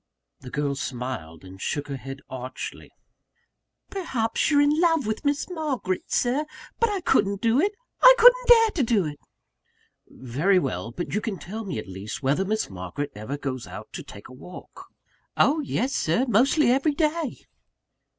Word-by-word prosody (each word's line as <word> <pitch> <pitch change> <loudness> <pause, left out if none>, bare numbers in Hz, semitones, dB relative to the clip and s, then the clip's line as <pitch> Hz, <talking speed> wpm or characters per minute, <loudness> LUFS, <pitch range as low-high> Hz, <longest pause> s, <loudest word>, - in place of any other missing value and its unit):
The 130 - -10
girl 145 +1 -1
smiled, 125 - -5
and 95 +1 -12
shook 145 0 -2
her 140 - -4
head 135 +1 -8
archly. 130 0 -7 1.0
"Perhaps 260 - -1
you're 290 -2 +4
in 295 +2 +3
love 325 -5 +3
with 215 0 -3
Miss 285 0 0
Margaret, 290 - -3
Sir! 260 +5 +1 0.3
But 465 - +3
I 400 -3 -2
couldn't 200 - +2
do 230 +4 +2
it! 405 +3 +1 0.3
I - - +10
couldn't - - +7
dare 455 -2 +7
to 335 - -1
do 225 -7 +2
it!" 145 -1 -6 0.9
"Very 145 +11 0
well; 115 - -2
but 175 +9 -5
you 210 - 0
can 210 -3 -3
tell 215 +6 -7
me 190 - -4
at 105 - -6
least, 95 +7 -7
whether 140 +8 +2
Miss 215 +3 -1
Margaret 95 +9 -5
ever 110 +7 -5
goes 130 -4 -5
out - - -10
to - - -5
take 100 - -12
a - - -13
walk?" 175 +8 -12 0.5
"Oh, 305 +3 +4
yes, 270 -2 -1
Sir; 170 +12 +1
mostly 250 - +4
every 275 +3 +2
day." 310 -2 -1
205 Hz, 170 wpm, -25 LUFS, -, 1.0 s, I